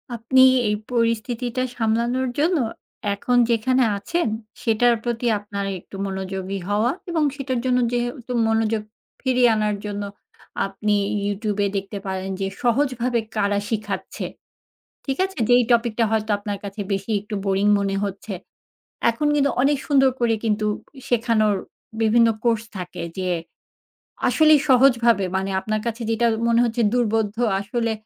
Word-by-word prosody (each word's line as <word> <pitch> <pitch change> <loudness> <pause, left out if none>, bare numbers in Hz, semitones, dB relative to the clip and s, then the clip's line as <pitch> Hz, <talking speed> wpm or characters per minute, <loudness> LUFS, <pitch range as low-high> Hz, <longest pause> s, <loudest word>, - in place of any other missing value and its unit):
আপনি 240 +3 +3 0.3
এই 210 - +1 0.2
পরিস্থিতিটা 235 +1 0
সামলানোর 235 +3 +1
জন্য 335 +4 +3 0.6
এখন 245 +5 0
যেখানে 255 +3 +2
আছেন, 340 - -1 0.3
সেটার 235 +1 +3
প্রতি 240 0 -2
আপনার 200 -1 -5
একটু 185 - -14
মনোযোগী 190 0 -4
হওয়া 215 +4 +2 0.2
এবং 325 -2 +1
সেটার 260 -3 -2
জন্য 250 -1 +3
যেহেতু 245 +1 -3 0.2
মনোযোগ 225 -1 +1 0.4
ফিরিয়ে 250 -2 +3
আনার 210 -1 0
জন্য 205 0 -3 0.6
আপনি 205 +2 -1 0.3
ইউটিউব 205 0 -2
এ - - +2
দেখতে 195 +1 -5
পারেন 190 0 -3
যে 195 - 0 0.2
সহজভাবে 245 -1 +1 0.2
কারা 200 -1 +1
শিখাচ্ছে, 210 -3 -4 0.8
ঠিক 270 - -1
আছে? 385 0 -6
যেই 245 0 +6
টপিকটা 235 -1 +2
হয়তো 220 -1 0
আপনার 205 0 -4
কাছে 200 +1 -6
বেশি 195 +2 -2
একটু 210 +2 -7
বোরিং 195 0 +1
মনে 195 0 -1
হচ্ছে। 200 +1 -5 0.8
এখন 235 +6 0
কিন্তু 280 -1 +3
অনেক 285 +2 +3
সুন্দর 270 -2 +5
করে 235 -2 +2
কিন্তু 215 -1 0 0.4
শেখানোর 225 -4 +2 0.5
বিভিন্ন 230 +1 +5 0.2
কোর্স 230 -2 +2
থাকে 180 -1 -6 0.2
যে 185 -1 -1 1.0
আসলেই 310 -1 +5
সহজভাবে 240 -5 +5
মানে 190 +1 -2
আপনার 215 +2 -2
কাছে 230 +1 -3
যেটা 225 +1 +1 0.2
মনে 235 0 +3
হচ্ছে 235 0 -1
দুর্বোধ্য 225 -3 +1 0.3
আসলে 230 +3 -1
225 Hz, 135 wpm, -22 LUFS, 205-245 Hz, 1.0 s, যেই